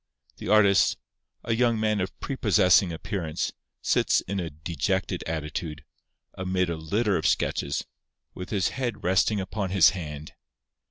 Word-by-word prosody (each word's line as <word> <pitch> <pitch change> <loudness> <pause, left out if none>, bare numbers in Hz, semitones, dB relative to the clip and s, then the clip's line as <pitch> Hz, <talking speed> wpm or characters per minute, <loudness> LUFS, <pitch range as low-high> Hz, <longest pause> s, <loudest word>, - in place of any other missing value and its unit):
_ - - -46
The - - -7
artist, 100 -2 +5 0.5
a 115 - 0
young 115 -1 +2
man 110 -2 +1
of 95 - -5
prepossessing 95 -8 +3
appearance, 80 -1 -3 0.3
sits - - +2
in 100 +1 -4
a 85 -2 -3
dejected 85 +5 -2
attitude, 75 -1 -4 0.5
amid 95 -1 -1
a - - -2
litter 100 +6 0
of 80 -2 0
sketches, 70 -1 0 0.5
with 90 - -7
his 100 -4 +1
head 120 -5 -4
resting 95 +3 +2
upon 95 +1 -3
his 90 -4 +6
hand. 75 -4 -7
95 Hz, 145 wpm, -26 LUFS, 80-105 Hz, 0.5 s, his